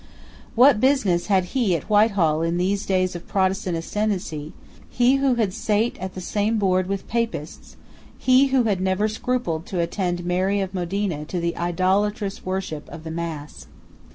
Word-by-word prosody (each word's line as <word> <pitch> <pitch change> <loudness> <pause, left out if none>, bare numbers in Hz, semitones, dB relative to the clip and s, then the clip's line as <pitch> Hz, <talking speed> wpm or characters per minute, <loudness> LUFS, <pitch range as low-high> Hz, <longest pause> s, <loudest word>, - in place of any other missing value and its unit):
What 250 -1 +6
business 220 -10 +2
had 190 -3 +3
he 235 -9 +2
at 160 - -5
Whitehall 200 -7 +3
in 165 +1 0
these 195 +3 0
days 185 -1 +1
of 175 - -8
Protestant 190 -2 0
ascendency, 170 -5 -3 0.4
he 250 +2 +3
who 270 -2 +2
had 215 -5 0
sate 215 +4 0
at 185 +1 -6
the 185 - -5
same 210 +4 0
board 185 -3 +1
with 195 0 -4
Papists, 230 -9 -4 0.4
he 260 +2 +4
who 265 -2 +2
had 200 -5 0
never 190 +3 +1
scrupled 215 -7 -2
to 185 - -3
attend 175 0 -1
Mary 185 +3 +1
of 190 -1 -3
Modena 180 -3 -2
to 175 +3 -3
the 170 0 -1
idolatrous 195 +4 0
worship 185 -5 -4
of 165 -2 -9
the 160 - -6
Mass? 150 - -6
190 Hz, 165 wpm, -23 LUFS, 175-215 Hz, 0.4 s, What